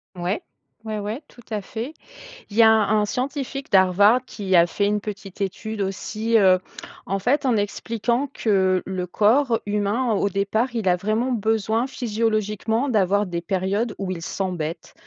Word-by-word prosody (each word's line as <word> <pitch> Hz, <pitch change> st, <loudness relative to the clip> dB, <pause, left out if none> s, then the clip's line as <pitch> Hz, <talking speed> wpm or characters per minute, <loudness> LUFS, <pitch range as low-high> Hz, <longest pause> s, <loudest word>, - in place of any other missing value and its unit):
Ouais. 180 Hz, +3 st, -2 dB, 0.4 s
Ouais, 215 Hz, -1 st, -3 dB
ouais, 215 Hz, +7 st, -4 dB
tout 240 Hz, -, -17 dB
à 210 Hz, -1 st, -1 dB
fait. 235 Hz, +9 st, -6 dB, 0.6 s
Il 205 Hz, -, -8 dB
y 230 Hz, -, +7 dB
a 220 Hz, -, +8 dB
un 215 Hz, -1 st, +3 dB
scientifique 275 Hz, +2 st, -4 dB
d'Harvard 200 Hz, +5 st, +5 dB
qui 195 Hz, -3 st, -3 dB
a 170 Hz, 0 st, +6 dB
fait 200 Hz, +4 st, -1 dB
une 205 Hz, 0 st, +1 dB
petite 200 Hz, -2 st, -8 dB
étude 205 Hz, +2 st, -3 dB
aussi, 215 Hz, +4 st, -1 dB
heu, 185 Hz, -3 st, +6 dB, 0.5 s
en 195 Hz, +1 st, -1 dB
fait, 265 Hz, +7 st, +1 dB
en 240 Hz, -3 st, +3 dB
expliquant 230 Hz, +5 st, -1 dB
que 190 Hz, -4 st, +2 dB
le 185 Hz, -1 st, -3 dB
corps 230 Hz, +6 st, +3 dB
humain, 210 Hz, +4 st, 0 dB
au 200 Hz, 0 st, +1 dB
départ, 215 Hz, +6 st, -1 dB
il 195 Hz, -5 st, +1 dB
a 180 Hz, -, +3 dB
vraiment 220 Hz, +7 st, 0 dB
besoin 220 Hz, +1 st, 0 dB
physiologiquement 225 Hz, +1 st, -1 dB
d'avoir 205 Hz, -1 st, +2 dB
des 175 Hz, -2 st, -3 dB
périodes 195 Hz, +5 st, -1 dB
où 195 Hz, -2 st, -3 dB
il 175 Hz, -3 st, -4 dB
s'embête. 170 Hz, -3 st, -4 dB
210 Hz, 165 wpm, -23 LUFS, 195-230 Hz, 0.6 s, a